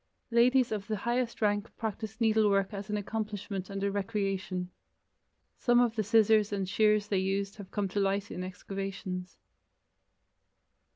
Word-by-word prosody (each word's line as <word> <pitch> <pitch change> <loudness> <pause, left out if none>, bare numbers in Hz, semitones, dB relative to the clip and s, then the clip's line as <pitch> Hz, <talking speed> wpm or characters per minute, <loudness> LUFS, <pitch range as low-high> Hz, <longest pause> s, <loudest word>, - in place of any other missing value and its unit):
Ladies 245 +1 +4
of 210 -1 -3
the 220 - -1
highest 235 +1 -1
rank 205 +1 +1
practiced 220 0 -4
needlework 215 -3 +3
as 200 +1 -6
an 210 - 0
accomplishment 205 -2 -4
and 195 0 -4
a 200 - +1
recreation. 195 -3 -2 0.9
Some 240 -1 +4
of 240 -2 +3
the 220 - +1
scissors 215 0 +4
and 195 -2 -1
shears 210 +1 +3
they 195 - +2
used 195 +1 -1
have 200 -3 -9
come 205 -2 -1
to 205 - -1
light 195 +1 0
in 180 - -4
excavations. 190 -1 -5
205 Hz, 150 wpm, -30 LUFS, 195-220 Hz, 0.9 s, Ladies